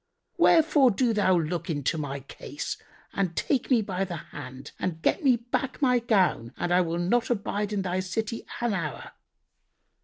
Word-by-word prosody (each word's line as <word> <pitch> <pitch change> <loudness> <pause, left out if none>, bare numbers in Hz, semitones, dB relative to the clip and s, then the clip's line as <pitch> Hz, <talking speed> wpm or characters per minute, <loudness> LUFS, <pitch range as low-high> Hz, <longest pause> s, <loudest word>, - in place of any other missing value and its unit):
Wherefore 300 -5 +5
do 235 +2 +1
thou 185 -4 +3
look 165 +1 -2
into 145 0 0
my 140 -3 -4
case 135 - -6 0.4
and 185 -4 -1
take 270 - 0
me 240 -5 +4
by 190 -1 -2
the 180 -2 -4
hand 130 -4 -9
and 170 -3 -2
get 360 - +1
me 260 -3 +5
back 245 +3 -3
my 250 -4 +3
gown 190 - +1
and 175 - 0
I 180 - +5
will 170 -1 -1
not 225 +7 +1
abide 210 -2 -1
in 200 -2 -1
thy 185 0 -1
city 210 +5 -3 0.2
an 240 -3 +1
hour." 165 -6 -4
195 Hz, 175 wpm, -27 LUFS, 170-235 Hz, 0.4 s, Wherefore